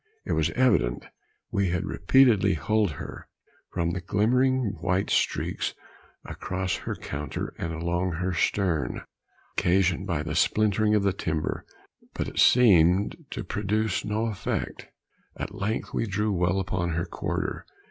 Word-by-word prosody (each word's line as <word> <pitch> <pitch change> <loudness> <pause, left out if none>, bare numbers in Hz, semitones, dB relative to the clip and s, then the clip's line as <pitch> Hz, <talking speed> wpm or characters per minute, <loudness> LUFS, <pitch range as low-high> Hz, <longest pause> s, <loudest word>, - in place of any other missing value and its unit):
It - - -4
was - - +2
evident 95 - +2 0.5
we 100 -2 +1
had 90 -1 -1
repeatedly 110 -8 +4
hulled 105 +4 +1
her, - - -8 0.4
from 85 0 0
the 90 - -3
glimmering 120 +3 +1
white 95 +1 0
streaks - - 0 0.5
across 95 -1 -3
her - - -4
counter 70 -1 -5
and 85 - -3
along 85 +2 -1
her 90 +3 -2
stern, 85 -7 0 0.6
occasioned 95 +1 +2
by 80 -5 -1
the 75 -1 -4
splintering 105 +4 +2
of 105 - +2
the 100 -1 +2
timber, 80 -4 -3 0.5
but - - -2
it - - -5
seemed 95 -5 +5
to - - -5
produce 105 +2 -1
no 105 +2 -1
effect. 105 -5 -3 0.5
At - - -5
length 105 +2 -3
we 115 - 0
drew 105 +2 0
well 90 +1 +1
upon 90 -2 -1
her 85 +1 -1
quarter. - - -3
95 Hz, 140 wpm, -26 LUFS, 85-105 Hz, 0.6 s, seemed